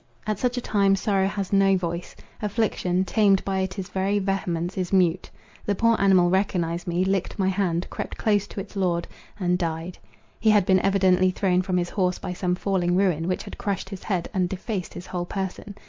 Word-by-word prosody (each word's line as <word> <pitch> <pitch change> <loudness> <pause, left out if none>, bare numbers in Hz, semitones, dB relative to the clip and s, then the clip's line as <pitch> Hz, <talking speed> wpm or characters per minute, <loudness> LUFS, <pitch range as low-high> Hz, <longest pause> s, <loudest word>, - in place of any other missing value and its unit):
At 215 -2 -2
such 250 0 0
a - - -1
time 200 -4 +2
sorrow 195 -1 +1
has 195 -1 -3
no 195 -1 +4
voice; 170 -1 -4 0.3
affliction, 200 -4 0
tamed 200 -2 +3
by 195 -1 0
its 190 0 -3
very 195 +2 0
vehemence, 185 -3 -1
is 185 -2 -2
mute. 185 -2 +2 0.3
The 205 - 0
poor 230 +2 +3
animal 185 -3 +4
recognised 180 -3 0
me, 175 +2 +1
licked 190 -1 -1
my 190 -2 +2
hand, 180 -3 0
crept - - -5
close 205 -2 +1
to - - -7
its 200 +2 -8
lord, 175 -3 0 0.3
and 180 -1 +1
died. 165 +1 -3 0.4
He 220 - +3
had 210 -3 +5
been 190 0 +4
evidently 185 -1 +3
thrown 185 -1 +1
from 185 0 -1
his 175 0 -1
horse 180 -3 0
by 180 - -5
some 180 0 -1
falling 180 -2 0
ruin, 180 -4 +1
which 185 - -1
had - - -10
crushed 195 -2 -2
his 195 -2 -7
head, 185 -5 -2
and 185 -3 +1
defaced 190 0 -4
his 175 - -7
whole 175 -1 -4
person. 195 +2 -5
190 Hz, 200 wpm, -25 LUFS, 180-195 Hz, 0.4 s, had